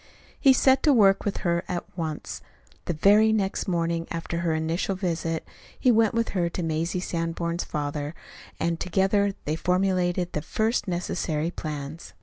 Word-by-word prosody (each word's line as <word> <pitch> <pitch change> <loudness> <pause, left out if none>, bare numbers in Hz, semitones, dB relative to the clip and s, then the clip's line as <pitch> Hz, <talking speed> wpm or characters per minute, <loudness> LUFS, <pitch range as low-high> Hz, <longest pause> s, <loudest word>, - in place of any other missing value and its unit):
He 275 - +6
set 265 +1 +4
to 300 - +4
work 195 -5 +4
with 205 - -1
her 170 0 +1
at 175 - -2
once. 160 -3 -4 0.4
The - - -1
very 210 +7 +5
next 200 -3 0
morning 170 -2 -1
after 170 0 -3
her 170 -2 0
initial 165 +5 -1
visit, 165 -3 -2 0.3
he 255 - +4
went 225 -1 +3
with 230 0 +1
her 175 -3 0
to 175 - -4
Mazie 165 +2 -1
Sanborn's 170 0 -2
father, 145 +1 -3 0.4
and 165 0 0
together 195 +2 +1
they 150 - 0
formulated 180 0 +1
the 150 - -1
first 220 +8 0
necessary 170 -3 -2
plans. 150 -1 -6
175 Hz, 155 wpm, -26 LUFS, 165-195 Hz, 0.4 s, He